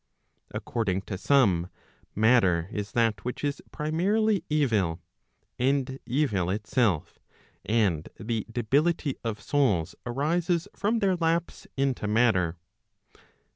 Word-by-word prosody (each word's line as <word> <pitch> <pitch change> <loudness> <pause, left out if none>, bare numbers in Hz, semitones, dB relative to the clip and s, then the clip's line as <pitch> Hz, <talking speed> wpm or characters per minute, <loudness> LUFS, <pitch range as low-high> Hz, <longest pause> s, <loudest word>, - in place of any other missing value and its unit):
According 100 -5 -2
to 100 - -5
some, 95 -6 +3 0.5
matter 95 -7 +3
is 105 -1 -5
that 115 -4 +1
which 125 +3 -5
is 145 -1 -1
primarily 190 +6 +1
evil, 110 - +1 0.6
and 135 +1 0
evil 115 - +1
itself, 105 - 0 0.4
and 100 -9 +1
the 110 0 -3
debility 140 +5 +1
of 110 -3 -3
souls 100 - +1
arises 165 +7 0
from 210 +4 0
their 195 -4 +2
lapse 165 0 -1
into 135 -5 0
matter. 105 -7 +2
120 Hz, 105 wpm, -27 LUFS, 100-150 Hz, 0.6 s, some